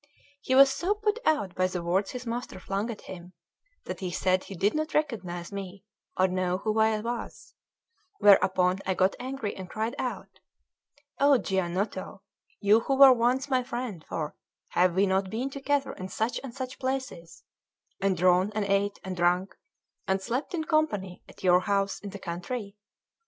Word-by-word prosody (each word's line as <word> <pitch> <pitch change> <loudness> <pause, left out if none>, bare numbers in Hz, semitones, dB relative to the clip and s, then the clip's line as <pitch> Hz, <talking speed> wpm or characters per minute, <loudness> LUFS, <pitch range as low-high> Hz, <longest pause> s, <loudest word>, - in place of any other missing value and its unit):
He 260 - 0
was 270 0 +8
so 375 +8 0
put 425 +2 0
out 250 - +1
by 185 +1 +1
the 180 -2 -4
words 185 +4 +1
his 250 0 -6
master 235 -4 -4
flung 195 +4 -3
at 225 - -6
him, 180 -1 -10 0.5
that - - -6
he 185 - -3
said 185 +1 +1
he 195 - -8
did 200 +4 +1
not 310 0 -2
recognise 185 - -2
me 195 -1 -7 0.3
or 185 - +4
know 185 0 0
who 215 +2 -1
I 220 0 +3
was; 235 +1 -6 0.6
whereupon 185 -2 +4
I 190 - -1
got 185 +1 +2
angry, 255 -4 -4
and 185 -1 -8
cried 220 +2 -2
out: - - -5 0.8
"O 280 -1 +6
Giannotto, 190 -1 -2 0.4
you 210 +2 +5
who 270 +4 0
were 270 -1 +9
once 250 +3 +1
my 260 -2 +2
friend 240 -8 -5
for 155 -2 -4 0.3
have 180 -1 +2
we 195 +2 +4
not 190 0 +1
been 245 +7 -3
together 275 0 -1
in 185 - -7
such 220 +5 -1
and 270 - -6
such 255 0 -6
places, 260 -11 -4 0.6
and 195 -2 +1
drawn, 185 +3 +3
and 215 -2 0
ate, 200 +1 0
and 190 -1 -4
drunk, 180 +2 +1 0.5
and 190 0 +1
slept 250 - -3
in 320 - -1
company 260 - 0
at - - -15
your 180 -1 +6
house 195 +1 0
in 205 - -7
the 200 - -8
country? 200 +4 -5
200 Hz, 175 wpm, -28 LUFS, 185-255 Hz, 0.8 s, were